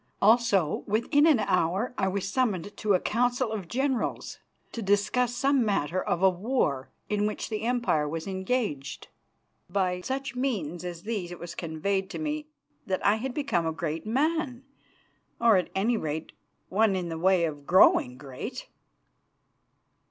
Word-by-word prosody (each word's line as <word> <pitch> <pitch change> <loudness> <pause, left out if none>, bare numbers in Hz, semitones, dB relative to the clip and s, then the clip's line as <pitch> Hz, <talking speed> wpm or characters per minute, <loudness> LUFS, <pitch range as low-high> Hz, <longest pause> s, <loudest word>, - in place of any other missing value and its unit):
Also, 205 -7 +3
within 240 +9 +3
an 305 -5 +6
hour, 190 +3 0
I 190 - 0
was 195 0 -2
summoned 205 -4 -1
to 210 -2 +2
a - - +2
council 245 +2 0
of 205 -5 -4
generals 265 +2 -2 0.3
to 230 - -5
discuss 215 +5 +1
some 270 +1 +3
matter 185 -4 0
of 175 - -1
a 190 - +8
war 180 - -1 0.2
in 210 0 +1
which 215 - -4
the 215 -2 -3
Empire 235 -11 +1
was 160 +1 -4
engaged. 190 - -3 0.6
By 180 -1 0
such 270 +4 -4
means 195 - -2
as 175 -1 -6
these 205 -5 -3
it 175 - -7
was 175 0 -7
conveyed 190 +4 -2
to - - -6
me 305 -1 -3 0.4
that 185 -1 -1
I 205 +2 +4
had 255 +3 -4
become 275 - 0
a - - 0
great 160 +3 -4
man, 275 +1 0 0.8
or, 230 -2 +5
at 180 - -1
any 220 +5 +2
rate, 155 -3 -4 0.4
one 205 0 +3
in 180 -2 -2
the 165 -1 -4
way 185 -1 +4
of 145 -3 -6
growing 125 -8 +5
great. 140 - -7
200 Hz, 160 wpm, -28 LUFS, 175-245 Hz, 0.8 s, a